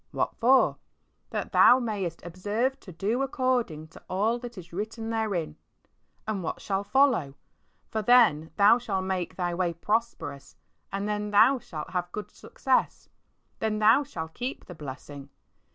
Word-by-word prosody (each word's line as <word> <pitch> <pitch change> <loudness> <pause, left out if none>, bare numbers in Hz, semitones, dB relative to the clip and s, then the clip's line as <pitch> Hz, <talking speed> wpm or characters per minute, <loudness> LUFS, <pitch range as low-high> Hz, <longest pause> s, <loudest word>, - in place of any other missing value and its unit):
What - - -2
for? 255 +3 +4 0.5
"That - - -4
thou 245 - +7
mayest 200 -9 -3
observe 205 +9 -2
to 185 - -12
do 205 +9 -1
according 250 - -1
to - - -15
all 215 +6 +1
that 240 -2 -9
is 175 -1 -11
written 220 +4 -4
therein." 190 -9 -2 0.7
And 210 -3 -2
what 165 - -4
shall 195 0 -2
follow? 230 - +2 0.6
"For 220 - -1
then 210 -10 +5
thou 210 +4 +6
shalt 195 -6 -2
make 185 -2 -2
thy 175 -2 -1
way 175 -1 0
prosperous, 210 -7 -3 0.4
and 200 +1 -2
then 210 0 -2
thou 225 +6 +5
shalt 155 -8 -8
have 180 -1 -2
good 210 +2 -6
success." - - -1 0.5
Then 220 -1 0
thou 220 +6 +5
shalt 160 - -7
keep 250 +3 -5
the 180 - -9
blessing. 140 -2 -9
205 Hz, 150 wpm, -27 LUFS, 175-230 Hz, 0.7 s, thou